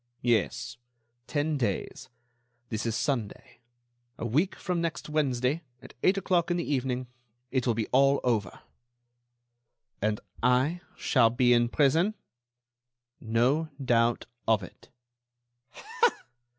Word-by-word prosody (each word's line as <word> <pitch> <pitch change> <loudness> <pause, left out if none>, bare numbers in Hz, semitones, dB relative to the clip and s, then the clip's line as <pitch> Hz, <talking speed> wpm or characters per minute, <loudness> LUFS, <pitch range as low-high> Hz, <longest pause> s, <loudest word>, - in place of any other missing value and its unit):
"Yes, 120 +1 0 0.5
ten 150 0 -1
days. 105 -6 -3 0.6
This 110 +1 -2
is 115 - -1
Sunday. 120 -2 -3 0.6
A - - -4
week 155 - +1
from 180 -2 -2
next 165 -2 -3
Wednesday, 140 -1 0 0.2
at - - -14
eight 190 +2 +3
o'clock 180 -3 +1
in 175 - +1
the 170 - -1
evening, 130 -2 -1 0.5
it 130 -1 0
will 115 - +2
be 110 -1 -1
all 135 +1 +4
over." 115 -5 -1 1.4
"And 105 +1 0 0.2
I 130 +8 +2 0.2
shall 115 -5 +3
be 120 +1 +3
in 120 0 +3
prison?" 160 - +2 1.0
"No 125 +8 +1
doubt 120 -3 +2 0.2
of 110 -3 +3
it." 90 - -13
125 Hz, 115 wpm, -28 LUFS, 115-150 Hz, 1.4 s, all